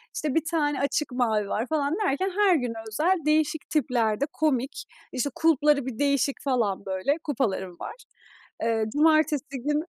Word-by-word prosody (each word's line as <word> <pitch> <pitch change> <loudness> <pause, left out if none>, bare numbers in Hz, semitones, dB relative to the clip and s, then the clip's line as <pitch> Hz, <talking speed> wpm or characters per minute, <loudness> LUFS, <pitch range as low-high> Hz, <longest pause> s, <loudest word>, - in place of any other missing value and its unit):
İşte 300 -3 -2
1 325 -1 +2
tane 295 -3 0
açık 285 +1 0
mavi 220 -5 +1
var 225 +4 -1
falan 300 0 0
derken 375 +5 0
her 395 -4 +5
güne 245 -6 -1
özel 315 - +1
değişik 310 0 +1
tiplerde 240 -5 +1
komik, 275 -4 -1 0.3
işte 260 +2 -1
kulpları 300 -3 +3
bir 255 -2 -6
değişik 280 -1 +1
falan 230 -8 0
böyle, 190 +10 0
kupalarım 195 - -2
var. - - -6 0.7
Iıı, 225 -1 0
cumartesi 305 -1 +2
günü. 295 +4 0
280 Hz, 150 wpm, -26 LUFS, 235-305 Hz, 0.7 s, her